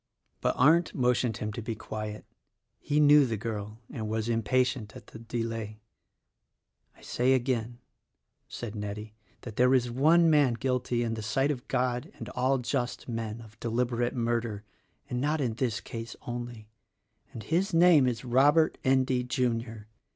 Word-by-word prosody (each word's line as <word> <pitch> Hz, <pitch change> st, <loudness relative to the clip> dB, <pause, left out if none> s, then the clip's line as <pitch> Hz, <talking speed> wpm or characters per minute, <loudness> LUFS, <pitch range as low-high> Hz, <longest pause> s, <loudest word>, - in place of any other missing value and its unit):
But -, -, +1 dB
Arndt 160 Hz, +6 st, +4 dB
motioned 125 Hz, -3 st, +1 dB
him 105 Hz, 0 st, -4 dB
to 120 Hz, -, -5 dB
be 115 Hz, 0 st, -4 dB
quiet 110 Hz, 0 st, -6 dB, 0.3 s
— -, -, -53 dB
he 150 Hz, -, +3 dB
knew 150 Hz, 0 st, +7 dB
the 115 Hz, -2 st, -2 dB
girl 105 Hz, -1 st, -5 dB
and 110 Hz, -5 st, -4 dB
was 110 Hz, +1 st, -2 dB
impatient 125 Hz, 0 st, 0 dB
at -, -, -11 dB
the 110 Hz, -, -12 dB
delay. 115 Hz, -2 st, -4 dB, 1.2 s
"I -, -, -20 dB
say 125 Hz, +2 st, +1 dB
again," 120 Hz, -2 st, -1 dB, 0.7 s
said 115 Hz, -4 st, -6 dB
Nettie, 105 Hz, 0 st, -6 dB, 0.3 s
"that 110 Hz, -3 st, -9 dB
there 125 Hz, +2 st, +5 dB
is 120 Hz, -2 st, +1 dB
one 160 Hz, +7 st, +4 dB
man 145 Hz, -6 st, +4 dB
guilty 125 Hz, -1 st, -1 dB
in 115 Hz, -1 st, -2 dB
the 110 Hz, -, -4 dB
sight 135 Hz, +7 st, +1 dB
of 125 Hz, -4 st, -6 dB
God 125 Hz, -1 st, -1 dB
and -, -, -7 dB
all 130 Hz, +2 st, +1 dB
just 125 Hz, 0 st, -3 dB
men 115 Hz, -1 st, -4 dB
of 110 Hz, 0 st, -15 dB
deliberate 120 Hz, +1 st, -1 dB
murder, 115 Hz, -3 st, -1 dB, 0.4 s
and 125 Hz, 0 st, -3 dB
not 150 Hz, +3 st, 0 dB
in 125 Hz, -5 st, 0 dB
this 115 Hz, -2 st, -1 dB
case 115 Hz, 0 st, -7 dB
only; 120 Hz, -2 st, -6 dB, 0.6 s
and 115 Hz, -5 st, -8 dB
his 170 Hz, -, 0 dB
name 165 Hz, -5 st, +6 dB
is 125 Hz, 0 st, -2 dB
Robert 145 Hz, +6 st, +3 dB
Endy, 130 Hz, -2 st, +2 dB
Junior. 115 Hz, -4 st, -2 dB
120 Hz, 160 wpm, -28 LUFS, 110-130 Hz, 1.2 s, knew